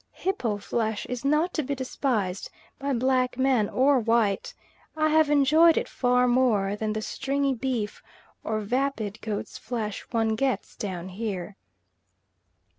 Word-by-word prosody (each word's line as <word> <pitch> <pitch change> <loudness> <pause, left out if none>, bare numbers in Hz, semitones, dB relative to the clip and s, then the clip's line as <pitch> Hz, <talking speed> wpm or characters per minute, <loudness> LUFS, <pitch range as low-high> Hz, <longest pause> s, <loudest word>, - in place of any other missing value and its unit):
Hippo 255 - -1
flesh 220 +1 -2
is 250 0 -4
not 300 +6 +2
to 310 - 0
be 280 0 -3
despised 240 -7 -2 0.3
by 280 0 -2
black 255 0 +1
man 260 -5 +2
or 270 +1 +3
white; 230 - +1 0.4
I 310 0 +3
have 315 -1 +4
enjoyed 305 +3 +5
it - - 0
far 250 0 +2
more 230 -6 +2
than 215 0 -2
the 215 0 -3
stringy 275 +2 -1
beef 240 -4 -3 0.4
or 215 -1 -1
vapid 225 -2 -2
goat's 215 -2 -4
flesh 220 -4 -4
one 225 -2 +1
gets 265 +2 -1
down 185 -3 -5
here. 195 -1 -4
245 Hz, 140 wpm, -26 LUFS, 215-275 Hz, 0.4 s, enjoyed